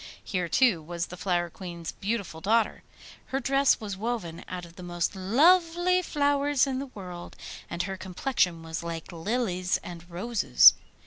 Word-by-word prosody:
Here, 180 -4 -2
too, 230 -9 +3
was 170 +2 -4
the 180 - -9
Flower 175 -2 -1
Queen's 170 -3 -7
beautiful 200 -6 -4
daughter. 220 +4 +1 0.5
Her 270 - -1
dress 275 +1 +3
was 205 -3 -5
woven 195 -6 -4
out 180 -1 -5
of 170 0 -16
the 180 - -11
most 175 +2 -2
lovely 340 - +4
flowers 285 -3 +2
in 265 -1 -2
the 275 - -5
world, 180 -3 -8 0.3
and 170 +1 -2
her 190 0 -4
complexion 180 -3 -1
was 160 0 -5
like 170 +1 -6
lilies 185 0 -1
and 175 0 -9
roses. 205 +6 +5
190 Hz, 155 wpm, -27 LUFS, 175-255 Hz, 0.5 s, roses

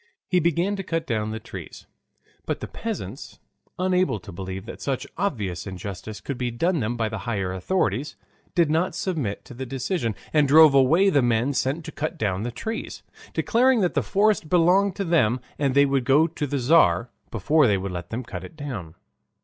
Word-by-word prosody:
He 180 - +3
began 170 +4 +1
to - - -2
cut 165 -2 -2
down 110 -5 -1
the 110 +1 -4
trees, - - -10 0.6
but - - -1
the - - -6
peasants, - - -6 0.4
unable 185 - +1
to - - -10
believe 95 +2 -6
that - - -9
such 135 -2 -2
obvious 105 - -2
injustice 100 +2 -7
could 130 +4 -5
be 125 -1 0
done 165 +9 0
them 120 0 -2
by 115 -1 0
the 110 -1 -4
higher 95 -5 -1
authorities, 120 - -1 0.4
did 170 -4 +3
not 165 +4 +1
submit 150 - -3
to 130 - -11
the 130 +2 -6
decision 130 - -2 0.2
and 150 -2 +4
drove 155 +1 +8
away 160 +9 +5
the 145 -5 +4
men 120 +3 +1
sent 140 +5 -1
to 160 - -6
cut 155 +1 -4
down 95 -3 -1
the 120 - -2
trees, 220 - -5 0.3
declaring 245 0 +3
that 180 - +1
the - - +2
forest 205 -5 +1
belonged 180 +3 +4
to 200 - -2
them 130 -8 +2 0.2
and 140 -2 +1
they 140 0 +6
would 135 -2 +1
go 145 +4 +5
to 155 -2 -3
the 140 +1 -1
Tzar 120 - +4 0.2
before 145 +7 +3
they 100 -2 +3
would 95 0 -4
let 85 -1 -6
them 120 +3 -4
cut 120 - -7
it - - -11
down. 115 - -6
135 Hz, 200 wpm, -24 LUFS, 110-170 Hz, 0.6 s, drove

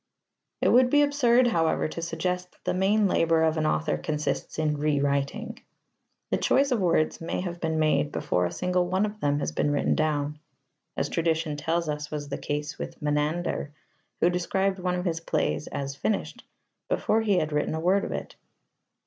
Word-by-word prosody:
It - - +4
would 250 +1 +5
be 290 +2 +5
absurd, 255 -4 +4
however, 165 -11 +1
to 165 - -6
suggest 180 +2 -3
that - - -30
the - - 0
main 200 +3 +3
labour 165 -3 +3
of 160 0 +2
an 155 0 +1
author 155 0 0
consists 150 -1 -3
in 150 -2 0
rewriting. 140 -2 -1 0.7
The - - +3
choice 275 0 +2
of 245 - +2
words 165 -4 +1
may 165 - -2
have 175 -2 -5
been 160 -1 0
made 155 -1 +2
before 90 0 0
a - - -7
single 180 -1 0
one 185 +3 +1
of 215 0 -6
them 145 -5 +1
has 145 - -2
been 110 - 0
written 145 -1 +1
down, 150 -1 -1 0.6
as - - 0
tradition 160 -2 0
tells 165 +3 -1
us 150 0 -3
was 145 -1 -5
the 140 - -4
case 150 0 -4
with - - -6
Menander, 150 +1 -1 0.5
who 175 - +4
described 190 +2 0
one 180 0 -1
of 180 +1 -3
his 165 -2 0
plays 165 -2 -1
as 140 -1 -4
"finished" 205 +8 -2 0.4
before 225 - +2
he 205 -4 +2
had 155 -3 0
written 150 +1 0
a - - -2
word 185 +4 +2
of - - -4
it. - - -5
165 Hz, 190 wpm, -27 LUFS, 150-185 Hz, 0.7 s, would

